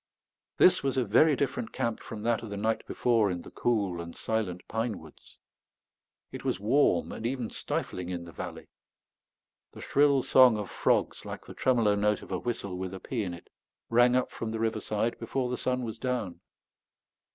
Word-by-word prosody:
This 180 - +6
was 135 -1 -1
a 130 - +2
very 150 +9 +5
different 130 -4 -2
camp 115 -2 -2
from 105 -2 -8
that 115 0 +1
of 115 - -7
the 100 - -5
night 110 +2 0
before 115 -4 +2
in 90 -2 -4
the - - -12
cool 100 -8 0
and 85 0 -8
silent 105 -6 -2
pine 110 -2 -2
woods. 80 -2 -15 0.9
It - - -7
was - - -1
warm 125 +8 +2
and - - -7
even 120 -1 -2
stifling 90 -1 -3
in 85 -1 -4
the 85 - -10
valley. - - -7 1.1
The - - -10
shrill 140 -2 +3
song 125 -4 +6
of 105 -3 -5
frogs, - - +1
like - - -7
the - - -10
tremolo 115 -5 +2
note 105 0 +1
of - - -12
a 90 - -1
whistle 100 -6 -4
with 95 0 -4
a - - -7
pea 120 +2 -3
in 90 -4 -3
it, 85 - -16 0.4
rang 120 +1 +5
up 125 - +1
from 115 - -4
the 110 0 -3
riverside 110 0 -1
before 125 +2 -2
the - - 0
sun 125 0 -1
was 115 -1 -5
down. 125 -8 -3
110 Hz, 190 wpm, -29 LUFS, 100-125 Hz, 1.1 s, This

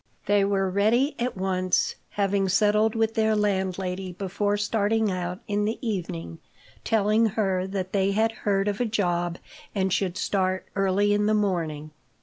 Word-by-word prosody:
They 205 -1 +3
were 195 -1 +1
ready 225 +10 +2
at 245 -3 -2
once, 185 -1 +1 0.2
having 195 -1 0
settled 210 +3 +3
with 225 0 +1
their 220 -1 +2
landlady 190 -2 -1
before 205 +2 -1
starting 210 0 +1
out 180 0 -4
in 205 0 0
the 220 +2 -1
evening, 85 - -4 0.4
telling 220 +1 +3
her 190 -4 0
that 190 -1 -4
they 195 -1 +2
had 220 +2 +2
heard 200 -3 -1
of 205 +2 -1
a - - +2
job 175 -5 -1 0.4
and 190 -2 +1
should 185 -3 -1
start 185 -1 0
early 195 +1 +2
in 205 0 +2
the 215 - +3
morning. 165 -7 -1
200 Hz, 155 wpm, -25 LUFS, 185-210 Hz, 0.4 s, They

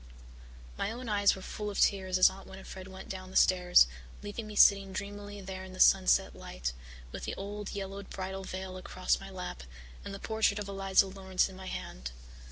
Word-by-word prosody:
My - - 0
own 240 +2 -6
eyes 205 -2 +4
were 190 - -9
full 210 -1 -4
of 200 - -4
tears 190 -2 +3
as 185 - +8
Aunt 195 +1 -5
Winnifred 190 0 -9
went 190 0 -10
down 185 -1 -6
the 190 - -12
stairs, 180 - +6 0.4
leaving 210 +2 -5
me 210 - -8
sitting 195 -2 +6
dreamily 205 +1 -6
there 190 0 -6
in 190 0 -10
the 185 - -10
sunset 190 -1 +5
light, - - -5 0.4
with - - -6
the - - -3
old 205 +1 -6
yellowed 195 0 -5
bridal 190 0 -5
veil 185 0 -6
across 185 0 0
my 195 - -9
lap 180 -1 -6 0.4
and - - -6
the 195 - -5
portrait 220 -1 +1
of 205 -1 -4
Eliza 195 -1 +3
Laurance 190 -1 0
in 190 - -11
my 190 0 -9
hand. - - -5
190 Hz, 195 wpm, -31 LUFS, 185-200 Hz, 0.4 s, as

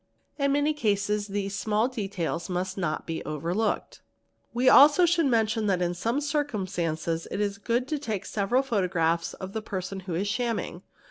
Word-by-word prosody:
In 280 0 +2
many 290 +2 +2
cases 210 -5 0
these 200 -1 -3
small 215 +3 +1
details 195 -8 -3
must 185 +1 -2
not 175 -5 -2
be 165 -1 -4
overlooked 170 +8 -1
®, - - -18
2 - - -28
_ - - -36 0.5
We 240 +1 -2
should - - +8
also 300 +5 +8 0.2
mention 225 -4 +1
that 190 -3 +2
in 175 -1 0
some 230 +10 -1
circumstances 185 - -2
it - - -4
is 200 -1 -1
good 240 +4 0
to 305 - -1
take 215 -8 -3
several 220 +6 +1
photographs 175 -8 0
of 190 +2 -8
a 220 - -1
person 190 -2 -5
who 185 -3 -5
is 195 +4 -1
shamming. 230 +1 -2
205 Hz, 185 wpm, -27 LUFS, 180-235 Hz, 0.5 s, should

